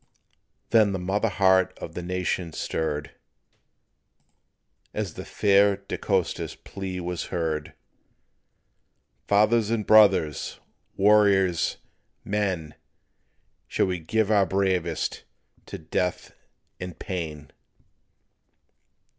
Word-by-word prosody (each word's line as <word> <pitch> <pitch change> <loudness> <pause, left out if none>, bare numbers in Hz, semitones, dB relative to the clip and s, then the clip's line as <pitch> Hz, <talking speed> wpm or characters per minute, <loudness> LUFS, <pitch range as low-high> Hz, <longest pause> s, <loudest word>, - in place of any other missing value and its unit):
Then 110 -3 +4
the - - -1
mother 100 +5 0
heart 95 -1 +3
of - - -8
the - - -5
nation 90 -1 -2
stirred, 75 -3 -3 1.8
As 105 -6 -3
the - - -7
fair 100 0 +3
De 100 0 -6
Costa's 95 -4 -1
plea 95 -2 -6
was 90 -1 -4
heard: 80 -3 -3 1.5
"Fathers 105 +2 +3
and 115 -2 -1
brothers! 95 -8 +4 0.4
warriors, 100 -4 +3 0.5
men! 95 -7 -2 0.9
Shall - - +1
we 90 -2 -2
give 110 +6 0
our 100 -3 +4
bravest 95 -4 -1 0.4
to - - -6
death 85 +3 -3 0.5
and 90 -2 -7
pain? 80 -5 -5
95 Hz, 95 wpm, -25 LUFS, 85-100 Hz, 1.8 s, Then